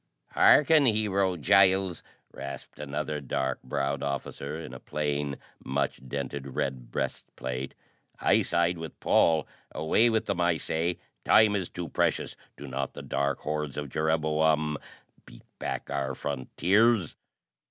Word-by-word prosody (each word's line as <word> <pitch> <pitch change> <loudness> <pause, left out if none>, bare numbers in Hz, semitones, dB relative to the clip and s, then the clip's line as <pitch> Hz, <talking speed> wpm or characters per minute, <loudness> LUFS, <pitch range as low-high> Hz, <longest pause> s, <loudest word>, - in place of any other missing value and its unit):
"Hearken, 150 -1 +6
Hero 100 -4 +1
Giles!" 95 +3 +4 0.3
rasped 70 0 -8
another 75 +1 -3
dark 65 -1 -2
browed 70 +2 -2
officer 70 +2 -4
in 75 -6 -8
a 65 - -8
plain, 75 -1 -2 0.3
much 70 0 -1
dented 70 0 -5
red 65 -3 -2
breast - - -3
plate. 65 +1 -4 0.4
"I - - +4
side 85 0 +1
with 80 -1 -8
Paul. 80 -3 +3 0.2
Away 80 +10 +3
with 110 -1 +1
them, 95 -3 -1
I 85 -1 +3
say! 80 +3 -1 0.3
Time 110 -1 +5
is 95 -4 -2
too 90 -2 -5
precious. - - 0 0.2
Do 70 - -8
not 70 0 -3
the - - -7
dark 70 -1 -1
hordes 75 -2 -3
of 75 -1 -4
Jereboam 75 0 +1 0.5
beat - - -14 0.2
back - - -4
our 70 -1 -2
frontiers?" 95 - +1
75 Hz, 135 wpm, -28 LUFS, 70-90 Hz, 0.5 s, Hearken